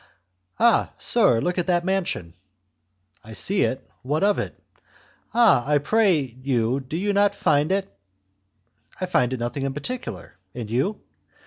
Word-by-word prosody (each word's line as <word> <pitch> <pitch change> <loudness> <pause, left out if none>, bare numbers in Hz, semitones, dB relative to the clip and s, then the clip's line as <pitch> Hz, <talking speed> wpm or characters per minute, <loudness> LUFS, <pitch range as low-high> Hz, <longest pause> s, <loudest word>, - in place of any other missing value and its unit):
"Ah, 235 0 +4
sir! 210 - +3
look 180 +7 -1
at 175 - -2
that 175 -1 +1
mansion!" 185 - -2 0.9
"I 110 - -11
see 195 - +2
it; 130 +1 -1
what 145 +7 -1
of 205 0 +3
it?" - - -5 0.7
"Ah! 230 - +5
I 150 - +4
pray 190 +1 +3 0.2
you, 125 -1 +1
do 135 +4 -5
you 205 +3 0
not 200 0 +3
find 150 -3 +2
it...." 195 0 0 1.1
"I 185 - -1
find 130 -8 +1
nothing 135 +3 -3
particular; 135 - -6 0.2
and 115 -3 -6
you?" 180 - -1
155 Hz, 140 wpm, -24 LUFS, 125-200 Hz, 1.1 s, Ah